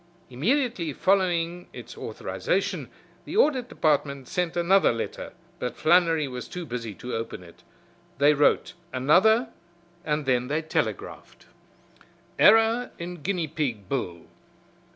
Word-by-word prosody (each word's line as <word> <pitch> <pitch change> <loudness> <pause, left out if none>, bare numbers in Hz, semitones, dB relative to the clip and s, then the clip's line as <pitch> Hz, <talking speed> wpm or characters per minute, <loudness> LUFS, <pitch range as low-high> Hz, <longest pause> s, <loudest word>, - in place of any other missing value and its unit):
Immediately 195 - 0
following 175 -1 +1
its - - -10
authorization - - -3 0.4
the - - -4
Audit 265 - +3
Department 140 -3 0
sent 175 -2 -2
another 185 +3 +4
letter, 115 -1 -5 0.3
but 125 - -4
Flannery 165 -3 +3
was 125 -1 -7
too 180 -1 -6
busy 115 -6 -5
to 125 - -7
open 115 -5 -5
it. 85 -1 -16 0.6
They 145 +2 +5
wrote 145 0 +2 0.2
another 200 - +4 0.5
and 150 -1 -1
then 125 -1 +1
they 150 +4 -1
telegraphed: 155 - -4 0.9
"Error 225 +2 +5
in 175 -1 -7
guinea 175 -1 -1
pig 135 - -3
bill. 90 -9 -3
160 Hz, 120 wpm, -26 LUFS, 130-185 Hz, 0.9 s, They